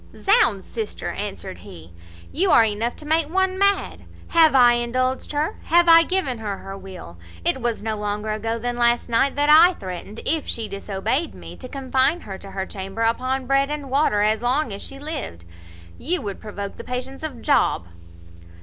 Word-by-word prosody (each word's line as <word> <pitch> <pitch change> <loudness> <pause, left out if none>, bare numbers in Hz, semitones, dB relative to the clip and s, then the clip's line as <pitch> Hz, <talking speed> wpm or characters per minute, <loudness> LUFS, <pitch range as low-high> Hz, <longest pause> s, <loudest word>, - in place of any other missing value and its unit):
"Zounds! 240 - +3
sister," 220 -3 -5
answered 195 -2 -6
he, 80 +1 -12 0.4
"you 370 +5 +1
are 230 - +7
enough 220 +3 -2
to 305 - -11
make 315 0 +1
one 380 +1 0
mad. 400 0 +1 0.2
Have 320 -4 +5
I 245 -2 +7
indulged 255 +2 -1
her? 300 +7 -1
Have 345 +1 +4
I 330 0 +9
given 330 -9 -1
her 205 -3 -4
her 195 - -8
will? 185 - -11 0.3
It 265 - +1
was 235 -3 -2
no 220 -1 -2
longer 210 +1 -3
ago 225 +2 -2
than 240 +1 -3
last 240 0 +2
night 235 +4 +2
that 290 +1 +3
I 340 +4 +7
threatened, 190 +3 -7
if 315 0 +1
she 225 -2 -3
disobeyed 205 - -3
me, - - -10
to 255 - -9
confine 265 +4 0
her 195 -2 -8
to 195 - -10
her 190 0 -4
chamber 195 +3 -5
upon 255 +3 0
bread 275 +1 +2
and 290 -3 -5
water 270 -7 +2
as 215 +1 +1
long 250 0 0
as 200 - -7
she 275 - -6
lived. 280 - -6 0.5
You 350 +4 -1
would 200 -2 -5
provoke 200 -2 -7
the - - -8
patience 255 +2 -5
of 295 -7 -6
Job." 280 - +2
245 Hz, 185 wpm, -22 LUFS, 210-295 Hz, 0.5 s, I